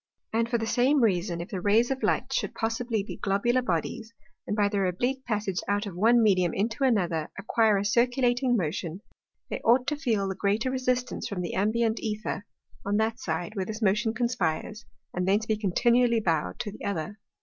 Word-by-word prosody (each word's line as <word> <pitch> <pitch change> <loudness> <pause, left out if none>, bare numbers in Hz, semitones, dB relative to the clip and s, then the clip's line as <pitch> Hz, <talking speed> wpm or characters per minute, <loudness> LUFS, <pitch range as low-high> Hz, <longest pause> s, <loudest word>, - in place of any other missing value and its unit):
And 230 +1 +1
for 235 - +1
the 225 - -2
same 255 +4 +3
Reason, 180 -4 +1
if 170 - -7
the 185 - -4
Rays 220 +6 +3
of 265 +1 -2
Light - - 0
should - - -1
possibly 225 -1 -1
be - - -7
globular 220 +6 +1
Bodies, 220 +3 -2 0.4
and 210 - -1
by 205 -1 +3
their 200 -2 0
oblique 245 +9 -1
Passage 205 -5 -1
out 205 +1 0
of 195 -4 -7
one 230 +5 +4
Medium 185 -5 +3
into 230 +6 -1
another, 175 -11 +1
acquire 215 +1 +2
a 200 - -1
circulating 245 +2 +2
Motion, 170 +1 -3 0.5
they - - -2
ought 245 +3 +4
to 300 - 0
feel 230 -10 0
the 190 - -2
greater 205 +6 0
resistance 255 -1 -1
from 195 -3 -4
the 175 - -4
ambient 220 +3 +1
Æther, 215 -3 -3 0.4
on 205 +1 0
that 220 +1 0
side, 170 +6 -3
where 195 - -1
this 220 +3 -5
Motion 215 +3 +2
conspires, 230 -3 -2 0.3
and 180 +1 -1
thence 205 +3 +2
be 220 - +1
continually 235 +4 +2
bowed 160 - -1
to 205 - -4
the 215 - -11
other. 200 +1 -3
215 Hz, 195 wpm, -27 LUFS, 195-240 Hz, 0.5 s, one